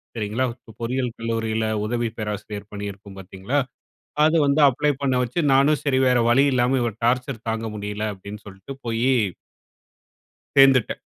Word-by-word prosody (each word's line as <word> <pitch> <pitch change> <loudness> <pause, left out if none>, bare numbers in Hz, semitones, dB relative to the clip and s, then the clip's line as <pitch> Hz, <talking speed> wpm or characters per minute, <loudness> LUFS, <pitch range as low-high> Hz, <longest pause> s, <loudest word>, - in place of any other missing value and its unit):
சரிங்களா! 110 +4 -1
இப்போ 125 -2 -17
பொறியியல் 125 +1 -1
கல்லூரியில 115 -1 -2 0.2
உதவி 120 +1 -1
பேராசிரியர் 105 -1 -5
பணியிருக்கும் 100 -1 -7
பாத்தீங்களா! 95 +8 -3 0.7
அது 160 +2 +3
வந்து 140 +2 +2
அப்ளே 150 +3 0
பண்ண 135 -2 +1
வச்சு 125 +7 -2
நானும் 140 +3 +4
சரி 135 -3 +2
வேற 125 -1 +3
வழி 135 +4 +5
இல்லாம, 125 +1 +2
இவர் 115 -2 -3
டார்ச்சர் 125 -1 0
தாங்கமுடியல 105 -2 -3
அப்டின்னு 100 +2 -10
சொல்ட்டு 95 +6 -10
போயி 115 +1 0 1.5
சேர்ந்துட்டேன். 135 -3 +5
115 Hz, 135 wpm, -23 LUFS, 105-130 Hz, 1.5 s, வழி